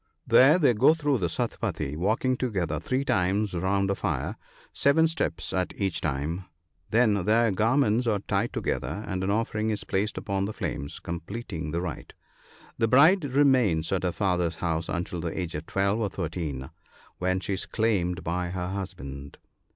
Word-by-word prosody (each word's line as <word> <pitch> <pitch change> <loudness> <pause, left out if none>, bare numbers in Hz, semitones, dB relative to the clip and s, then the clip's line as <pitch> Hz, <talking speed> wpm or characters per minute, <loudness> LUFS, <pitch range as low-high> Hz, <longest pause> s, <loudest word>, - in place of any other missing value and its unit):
There 145 +6 +6
they 145 -8 +4
go 135 +9 +5
through 145 -5 0
the 90 - 0
suptnpadi 70 - -2
y - - -5
walking 110 +9 +1
together 90 - -1
three 130 - -1
times 100 0 +1
round 95 +2 +1
a - - +2
fire, - - -2 0.4
seven 160 +3 +4
steps 125 - -2
at 90 -1 -1
each 95 -4 0
time; 80 +5 -2 0.4
then 110 -4 +3
their 115 +1 +3
garments 115 +2 +2
are 110 -2 +2
tied 100 +3 -1
together, 105 - -3
and 95 -1 -3
an 95 - -1
offering 110 0 0
is 105 - -2
placed 100 +3 -1
upon 100 -1 -1
the 105 - -4
flames, 70 -7 -4
completing 85 -1 -5
the 85 +3 -2
rite. 90 -5 -6 0.6
The 115 - +3
bride 150 - +5
remains 130 - +3
at 95 - +1
her 90 - 0
father's 90 -4 0
house 80 -1 -2
until 90 -1 -3
the 85 +3 -3
age 85 -2 -3
of 75 +2 -6
twelve 100 +3 +1
or 105 -3 0
thirteen, 80 -7 -4 0.5
when 95 +1 +1
she 100 - -3
is 95 - -1
claimed 90 -6 0
by 90 +2 -1
her 90 0 -3
husband. 70 -8 -6
95 Hz, 175 wpm, -27 LUFS, 85-115 Hz, 0.6 s, There